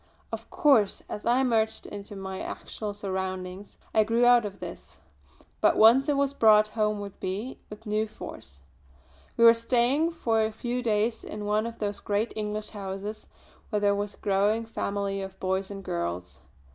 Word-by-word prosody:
Of - - -6
course 260 -9 +3
as 210 - -5
I 250 +3 +4
merged 220 -3 +1
into 205 0 -8
my 190 -1 -5
actual 210 -2 -6
surroundings 190 -1 -5 0.2
I 220 - +5
grew 230 +3 +2
out 245 -2 +6
of 200 -1 -7
this; - - -9 0.6
but - - +4
once 245 +6 +6
it 285 - +2
was 280 0 +1
brought 215 -4 +5
home 210 -2 -1
to 200 - -12
me 205 +8 -4
with 210 +2 -11
new 215 +1 0
force. 70 - -11 0.7
We 235 - +4
were 230 - +10
staying 250 +7 +2
for 225 -9 +1
a 220 - 0
few 240 +3 -3
days 225 0 0
in 210 0 -6
one 210 +2 +1
of 230 - -8
those 205 -1 -3
great 210 +3 -1
English 210 0 -3
houses 200 +1 -6 0.4
where 210 - 0
there 205 0 +3
was 205 0 -3
a - - -29
growing 205 +3 +1
family 200 -3 -2
of 190 0 -8
boys 190 +1 -1
and 195 -1 -7
girls. 85 - -4
210 Hz, 175 wpm, -27 LUFS, 200-230 Hz, 0.7 s, were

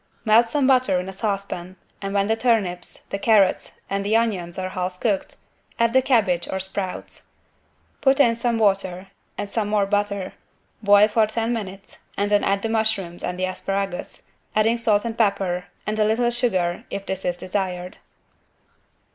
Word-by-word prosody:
Melt 225 +2 +5
some 280 +2 +1
butter 255 -8 +3
in 180 - -5
a 190 - -6
saucepan 195 -3 -3 0.3
and 195 -1 -3
when 200 0 +2
the 220 +2 +1
turnips, 215 -7 0
the 195 - -2
carrots 200 -3 +3
and 195 0 -2
the 210 +2 +1
onions 195 -7 0
are 185 0 -3
half 180 0 -4
cooked, 205 -5 -1 0.4
add 230 0 +2
the 260 - +5
cabbage 200 -10 +2
or 190 - -2
sprouts. 190 0 -5 0.7
Put 270 0 +3
in 235 -5 +5
some 235 0 0
water 195 -3 +1 0.3
and 205 - -3
some 210 +1 -2
more 210 -1 +2
butter, 200 -1 -1 0.5
boil 205 0 +6
for 215 0 +2
ten 225 +2 -1
minutes 195 -3 -7 0.2
and 205 +1 0
then 205 - +4
add 195 0 +1
the - - +1
mushrooms 220 -6 0
and 180 - -3
the 185 - 0
asparagus, 195 0 -4 0.3
adding 225 +2 +3
salt 215 -1 +2
and 230 -1 -3
pepper, 195 -5 0 0.2
and 215 +1 -2
a - - +5
little 230 +3 +2
sugar 185 -8 0
if 195 - -5
this 190 0 -4
is 175 -1 -1
desired. 185 0 -3
200 Hz, 170 wpm, -23 LUFS, 185-225 Hz, 0.7 s, boil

